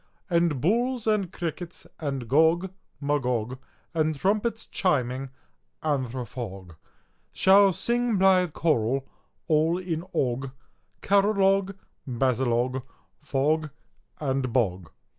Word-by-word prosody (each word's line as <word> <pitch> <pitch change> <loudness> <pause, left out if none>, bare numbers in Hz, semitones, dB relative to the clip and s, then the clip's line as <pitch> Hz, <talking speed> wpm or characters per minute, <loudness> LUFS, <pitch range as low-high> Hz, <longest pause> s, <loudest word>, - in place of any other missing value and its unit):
And 170 -5 +2
bulls, 235 - +1
and 210 -5 +1
crickets, 175 -1 -6
and 135 -6 -3
Gog, 160 +7 +3 0.3
Magog, 130 -4 -1 0.3
And 155 -2 0
trumpets 215 +5 0
chiming 135 - -1 0.5
anthrophog, 125 - -4 0.6
Shall 195 +1 +6
sing 235 +5 0
blithe 185 -3 +4
choral 135 -4 0 0.4
all 160 +2 +3
in 170 -3 -3
og, 130 +1 0 0.5
Caralog, 195 -1 +3 0.3
basilog, 125 0 0 0.4
fog, 150 +2 0 0.5
and 135 -3 -1
bog! 95 -8 0
155 Hz, 90 wpm, -26 LUFS, 130-190 Hz, 0.6 s, Shall